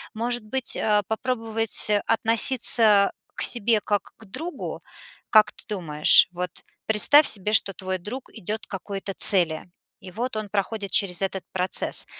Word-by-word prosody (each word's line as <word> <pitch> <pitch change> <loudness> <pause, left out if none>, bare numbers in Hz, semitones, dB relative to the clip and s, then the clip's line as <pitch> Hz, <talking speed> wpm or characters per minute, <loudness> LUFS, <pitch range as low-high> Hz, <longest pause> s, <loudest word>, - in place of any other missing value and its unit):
Может 240 +1 -3
быть, 260 +3 0
а, 210 -1 0
попробовать 225 -2 -1 0.2
относиться 225 -2 +2 0.2
к - - -5
себе 225 -2 +2
как 205 -1 -4
к 220 - -16
другу? 305 - -8 0.5
Как 215 -1 +3
ты - - -14
думаешь? 155 -7 +5
Вот 180 0 -5 0.4
представь 275 +8 +5
себе, 210 +1 -1
что 200 -2 +3
твой 185 0 -5
друг 240 +8 -10
идет 220 +1 -7
к - - -39
какой-то 195 +1 -7
цели. 175 -6 +4 0.3
И 185 - -13
вот 240 +5 -6
он 215 - -5
проходит 200 0 -5
через 185 -2 0
этот 190 -1 -3
процесс. 185 0 +1
210 Hz, 150 wpm, -22 LUFS, 190-225 Hz, 0.5 s, думаешь